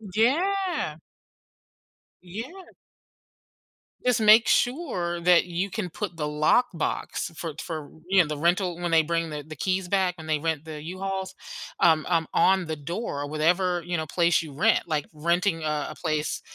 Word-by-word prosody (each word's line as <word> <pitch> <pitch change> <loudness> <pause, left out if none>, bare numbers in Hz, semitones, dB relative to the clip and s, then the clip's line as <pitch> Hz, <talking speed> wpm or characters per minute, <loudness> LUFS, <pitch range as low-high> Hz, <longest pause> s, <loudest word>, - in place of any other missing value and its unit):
Yeah. 330 - +1 1.3
Yeah. 240 - -8 1.3
Just 250 -2 +3
make 215 +2 +7
sure 235 - 0
that 180 0 +5
you 180 +3 -2
can 185 -2 -4
put 185 -5 -5
the 150 - -3
lockbox 160 +2 0
for 165 -2 -4
for, 155 -4 -6 0.2
you 190 -1 +6
know, 165 - 0
the 150 - -4
rental 175 +2 +1
when 175 - -1
they 165 -1 +4
bring 165 +1 -1
the 150 -1 -5
the 155 0 -9
keys 185 +4 -1
back 185 -2 +1
and 160 -1 -10
they 155 -1 +1
rent 160 -1 -2
the 155 -2 -7
U-Hauls, 190 +3 -4 0.4
um, 160 -2 +4
um, 165 -2 +1
on 190 -1 +3
the 160 -1 -3
door, 145 -1 -4
whatever, 175 +4 +1
you 175 -1 -1
know, 160 - -3
place 170 0 +2
you 155 -4 -9
rent, 220 +10 +3
like, 155 -3 -1
renting 170 +2 0
a 150 -1 0
a - - -10
place 155 -3 -1
175 Hz, 165 wpm, -26 LUFS, 155-195 Hz, 1.3 s, make